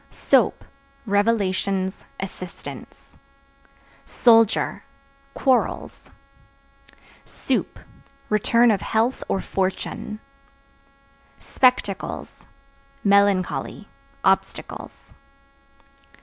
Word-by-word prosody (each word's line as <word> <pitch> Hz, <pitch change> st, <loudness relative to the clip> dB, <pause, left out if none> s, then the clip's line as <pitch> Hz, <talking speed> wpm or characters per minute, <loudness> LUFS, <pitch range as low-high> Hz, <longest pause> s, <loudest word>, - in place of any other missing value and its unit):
Soap -, -, +1 dB, 0.4 s
Revelations, 200 Hz, -2 st, 0 dB
assistance. 185 Hz, -2 st, -9 dB, 0.9 s
Soldier 225 Hz, -3 st, +3 dB, 0.5 s
Quarrels. 260 Hz, -3 st, 0 dB, 1.1 s
Soup -, -, -3 dB, 0.5 s
Return 230 Hz, +3 st, +3 dB
of 200 Hz, -4 st, 0 dB
health 230 Hz, +6 st, 0 dB
or 195 Hz, -, -1 dB
fortune. 190 Hz, +2 st, -3 dB, 1.2 s
Spectacles 250 Hz, -7 st, -1 dB, 0.6 s
Melancholy, 200 Hz, -2 st, +1 dB, 0.4 s
obstacles. -, -, -2 dB
205 Hz, 50 wpm, -23 LUFS, 195-230 Hz, 1.2 s, Soldier